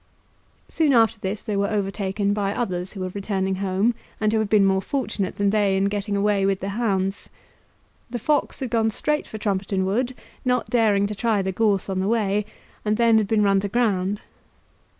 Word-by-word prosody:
Soon 310 -4 +2
after 225 -2 +4
this 200 +1 -4
they 210 -3 -3
were 200 0 +1
overtaken 200 -1 -1
by 200 -1 0
others 185 -5 -3
who 195 - -7
were 185 - -2
returning 195 -1 -1
home, 195 +4 +1 0.3
and 215 0 +1
who 220 - +2
had 215 -2 -1
been 205 -2 +5
more 190 0 +2
fortunate 235 -6 -2
than 200 0 +1
they 205 -2 +2
in 195 - +1
getting 200 0 -1
away 200 -1 +2
with 195 -1 +1
the 195 - -4
hounds. 195 -3 -1 0.8
The 240 - -3
fox 290 +4 0
had 255 -4 -3
gone 225 -1 +2
straight 300 +7 -1
for 220 - -7
Trumpeton 195 -2 -1
Wood, 240 +6 -1 0.3
not 250 -1 0
daring 215 -4 +3
to 205 - -3
try 210 -1 0
the 190 - -1
gorse 200 -1 +1
on 190 -1 -2
the 190 - 0
way, 210 -2 +1 0.4
and 210 0 0
then 230 -2 +5
had 210 - -1
been 215 0 +2
run 195 -1 +4
to 200 - -2
ground. 200 -3 0
205 Hz, 200 wpm, -23 LUFS, 195-220 Hz, 0.8 s, been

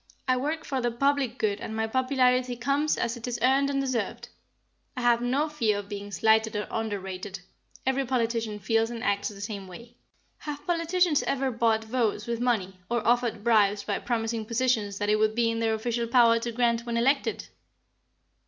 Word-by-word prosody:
I 255 - +3
work 300 +5 -2
for 265 -2 -2
the 240 - +1
public 265 0 0
good 210 -4 -1
and 220 - -5
my 220 0 0
popularity 255 0 +2
comes 280 +5 0
as 235 +1 -1
it 235 0 -7
is 245 -1 -2
earned 270 +2 +3
and 275 -1 0
deserved. 255 -6 -2 0.7
I - - -2
have 240 -1 +3
no 265 +5 +1
fear 235 -9 0
of 205 0 -7
being 205 -1 -6
slighted 220 +1 +2
or 210 - -2
underrated. 195 -3 -4 0.4
Every 265 +1 +1
politician 230 -4 -1
feels 225 +3 +1
and 235 -1 -6
acts 200 0 0
the 205 -2 -11
same 200 -2 -5
way." 235 +6 -12 0.4
"Have 295 -1 -7
politicians 340 -2 +2
ever 270 -1 0
bought 225 -2 +1
votes 220 -2 -1
with 235 -1 -2
money, 200 -7 -1
or 235 -2 -1
offered 235 -3 +1
bribes 210 -3 +3
by 205 - -2
promising 225 -2 -2
positions 230 -4 0
that 205 0 -1
it 210 - +4
would 215 0 +1
be 230 -1 +2
in 225 - -2
their 225 -1 +1
official 235 +1 -2
power 230 -1 +5
to 235 +1 -3
grant 235 0 +1
when 235 -1 -2
elected?" 270 +4 +1
235 Hz, 190 wpm, -27 LUFS, 220-255 Hz, 0.7 s, power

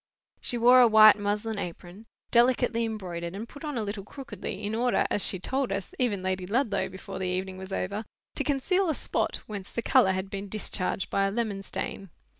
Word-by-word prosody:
She 240 - -1
wore 245 +2 +7
a 245 - +8
white 215 -1 +8
muslin 210 +1 -2
apron, 180 +4 -8 0.2
delicately 240 -1 +3
embroidered, 180 -5 -5
and 220 +4 -6
put 285 - -12
on 295 -4 -3
a 225 - 0
little 205 -1 -4
crookedly, 225 -4 -7
in 205 +1 -2
order, 240 +2 +2
as 205 - +2
she 190 - 0
told 260 +8 -2
us, 195 -1 -3
even 210 -7 0
Lady 185 -1 -2
Ludlow, 220 -1 0
before 190 - -8
the 190 - -1
evening 185 +1 -3
was 190 +1 -8
over, 200 +3 -2 0.3
to - - -2
conceal 335 +7 +1
a 310 - +1
spot - - -1
whence 200 -3 -7
the 235 - -3
colour 190 -3 +4
had 190 +1 -4
been 200 0 -5
discharged 195 -2 -2
by 195 0 +2
a - - -2
lemon 215 -3 -2
stain. 195 0 -5
205 Hz, 205 wpm, -28 LUFS, 190-235 Hz, 0.3 s, a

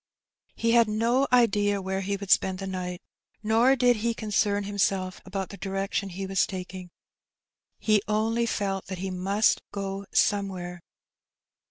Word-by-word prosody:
He 230 - +1
had 235 -1 +5
no 235 +5 +2
idea 205 -4 +3
where 190 0 -3
he 200 +1 -2
would 195 -1 -6
spend 190 -1 +3
the 195 - -5
night, 180 -1 -5 0.4
nor 230 +5 +4
did 245 -2 +3
he 230 +2 -1
concern 210 -2 0
himself 195 -2 -1
about 190 -1 -4
the 200 - -9
direction 195 0 -2
he 190 +2 -5
was 190 0 +1
taking; 185 -1 -7 0.9
he 215 -2 +2
only 225 +2 +1
felt 195 -3 -2
that 185 -1 -5
he 190 +1 -4
must 195 +4 +2
go 195 0 -5
somewhere. 185 -4 0
200 Hz, 150 wpm, -27 LUFS, 190-215 Hz, 0.9 s, had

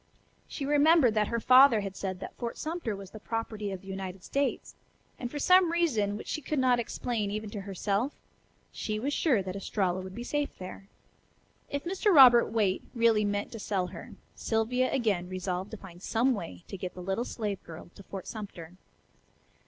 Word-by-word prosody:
She 280 - -5
remembered 295 -3 +5
that 210 -1 +2
her 235 - -1
father 255 -2 +7
had 195 -1 -5
said 190 -2 -4
that - - -7
Fort 235 -1 -5
Sumter 315 -9 -3
was 195 -1 -10
the 215 - -9
property 215 -2 -4
of 190 -2 -6
the 195 - -16
United 190 -1 -6
States; 280 0 -2 0.5
and, 245 - -4
for 290 - -6
some 365 +3 +5
reason 230 -13 +1
which - - -9
she 310 - -3
could 300 +2 -3
not 255 -2 +3
explain 230 -2 -2
even 215 0 -4
to 205 - -5
herself, 200 +6 -1 0.6
she 215 -1 -3
was 275 +7 -2
sure 255 - +2
that 185 0 -5
Estralla 190 -2 -1
would 185 0 -8
be 240 - -5
safe 290 +3 -2
there. 185 +1 -9 0.8
If 285 0 -3
Mr. 385 +4 +1
Robert 255 -7 +8
Waite 210 -4 +1
really 230 -2 +4
meant 205 0 -1
to 225 - -7
sell 195 -3 -1
her, 170 - -9 0.2
Sylvia 240 +3 0
again 205 -9 0
resolved 185 +1 -3
to 220 - -7
find 180 -3 -13
some 240 +6 +2
way 90 - -6
to 195 - -6
get 180 0 -6
the 180 - -7
little 195 +5 -1
slave 210 -5 -4
girl 165 +1 -11
to - - -13
Fort 195 -1 -8
Sumter. 185 -5 -8
215 Hz, 190 wpm, -29 LUFS, 195-255 Hz, 0.8 s, Robert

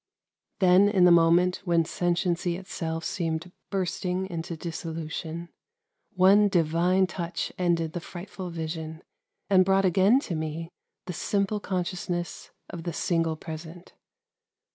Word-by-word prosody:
Then 190 +1 +5
in 190 -3 +4
the 180 - +7
moment 170 +2 +5
when 170 -3 +2
sentiency 175 0 0
itself 165 -3 -4
seemed 165 0 -2 0.2
bursting 185 0 -2
into 165 0 -4
dissolution, 165 0 -5 0.7
one 195 +3 +6
divine 175 +2 +2
touch 175 -1 -4
ended 170 -3 +1
the 175 - -3
frightful 180 +2 -8
vision, 160 -1 -5 0.4
and 190 -2 +5
brought 195 +1 +3
again 190 +7 +4
to 200 - -5
me 160 +1 -4 0.3
the 180 - -5
simple 200 +4 0
consciousness 175 -2 -3 0.2
of 175 - -7
the 170 0 -4
single 165 -1 0
present. 160 +2 -9
175 Hz, 120 wpm, -27 LUFS, 165-185 Hz, 0.7 s, the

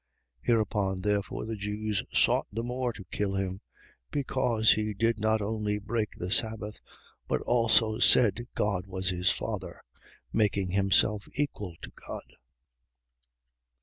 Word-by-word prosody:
5:18. - - -23
Hereupon 105 -4 +1
therefore 105 +1 -1
the 110 0 -3
Jews 105 0 -2
sought - - +3
the 115 +3 -3
more 125 +1 -2
to 110 -4 -10
kill 100 -1 -1
him, 95 0 -2 0.5
because 125 -5 +2
he 110 -1 0
did 115 +2 +1
not 110 0 +1
only 105 0 -1
break 105 +1 -2
the 90 +1 -5
sabbath 110 -2 -1 0.5
but - - +1
also 115 -2 +3
said 120 +1 +5
God 100 -3 0
was 95 -1 -2
his 90 0 +1
Father, - - -4 0.5
making 100 -4 +1
himself 100 +2 +2
equal 105 - -3
to - - -7
God. 60 - -9
105 Hz, 135 wpm, -29 LUFS, 100-110 Hz, 0.5 s, said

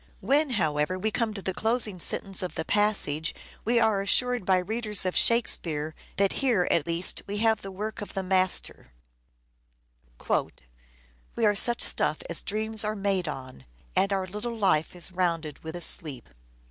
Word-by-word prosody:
When, 290 +2 +2
however, 155 0 0
we 215 +4 -1
come 220 -1 -1
to 195 - -7
the 190 - -2
closing 220 -2 0
sentence 195 +3 +1
of 180 - -5
the 160 - -3
passage 195 -7 0 0.3
we 235 +1 +2
are 220 -3 +2
assured 245 +2 +2
by 190 -1 +4
readers 210 +1 +1
of 185 - -1
Shakespeare 160 -10 +2 0.2
that 200 -1 +2
here, 235 -10 +2
at 160 -2 +1
least, 170 +2 0
we 205 +1 -4
have 220 0 +2
the 195 - -7
work 210 +3 -6
of 205 - -8
the 195 - -2
master: 185 - 0 2.4
"We 230 - +2
are 205 - +4
such 240 +3 +5
stuff 155 - 0
as 170 - +2
dreams 215 +1 0
are 215 0 -2
made 195 -3 -1
on, 130 - -8 0.3
and 195 - +2
our 190 -1 0
little 210 +5 -5
life 180 -6 +1
is 175 +1 -4
rounded 165 -5 -2
with 160 +1 -7
a 175 - -5
sleep." 145 -8 0
195 Hz, 170 wpm, -27 LUFS, 170-220 Hz, 2.4 s, such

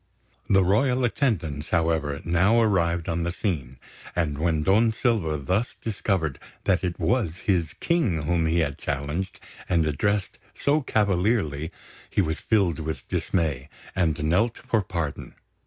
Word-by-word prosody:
The 95 -1 +5
royal 125 +7 +2
attendants, 85 - -1
however, 80 -4 0
now 95 +7 +4
arrived 85 -6 +2
on 85 0 -1
the 85 +1 -1
scene; 75 - -3 0.4
and 75 -5 0
when 80 -1 +1
Don 110 +6 +4
Silva 110 -10 0
thus 95 - -1
discovered 95 -8 -1 0.2
that 95 -1 +2
it 90 -1 -2
was 110 -10 +1
his 85 -6 +1
King 130 - 0
whom 80 +1 +1
he 85 +1 +2
had 70 -3 -2
challenged 75 +7 -3 0.3
and 85 -3 +3
addressed 100 +6 -1 0.2
so 150 +2 +2
cavalierly, 95 - +1 0.4
he - - -1
was 80 -4 +1
filled 95 -8 +1
with 80 0 -5
dismay, 75 -6 -1 0.3
and 80 -4 +1
knelt 95 +10 +2
for 110 - 0
pardon. 85 -6 -4
85 Hz, 140 wpm, -25 LUFS, 80-105 Hz, 0.4 s, The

